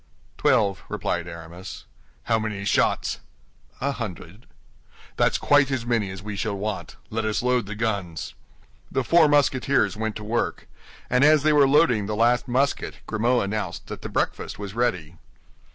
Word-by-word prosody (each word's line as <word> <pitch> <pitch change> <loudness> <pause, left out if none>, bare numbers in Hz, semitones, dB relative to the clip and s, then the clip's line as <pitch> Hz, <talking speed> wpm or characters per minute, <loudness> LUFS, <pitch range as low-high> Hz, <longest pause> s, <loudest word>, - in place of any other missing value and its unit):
"Twelve," 100 -2 +2
replied 85 0 -2
Aramis. 85 +2 -9 0.4
"How 115 -1 +1
many 105 -2 -4
shots?" - - +1 0.6
"A 140 +2 0
hundred." 105 - -7 0.7
"That's - - +2
quite 145 -1 +4
as 130 -4 -2
many 115 -5 0
as 95 0 -8
we 105 -1 -5
shall 100 +1 -2
want. 105 0 -4 0.2
Let 110 +1 -1
us 110 +1 -1
load 125 -4 +1
the 105 - -5
guns." 100 - -3 0.6
The 135 - 0
four 165 +3 +5
Musketeers 135 -6 +2
went 110 0 -3
to 105 - -6
work; 115 +3 -2 0.4
and 125 +2 +3
as 150 -1 +6
they 155 0 +4
were 145 -2 +6
loading 130 -8 +3
the 105 - -2
last 120 +2 +2
musket 135 +3 0
Grimaud 120 +3 +1
announced 100 -3 -3
that - - -6
the - - -6
breakfast - - -2
was 100 -1 -6
ready. 90 -9 -1
110 Hz, 160 wpm, -24 LUFS, 100-125 Hz, 0.7 s, as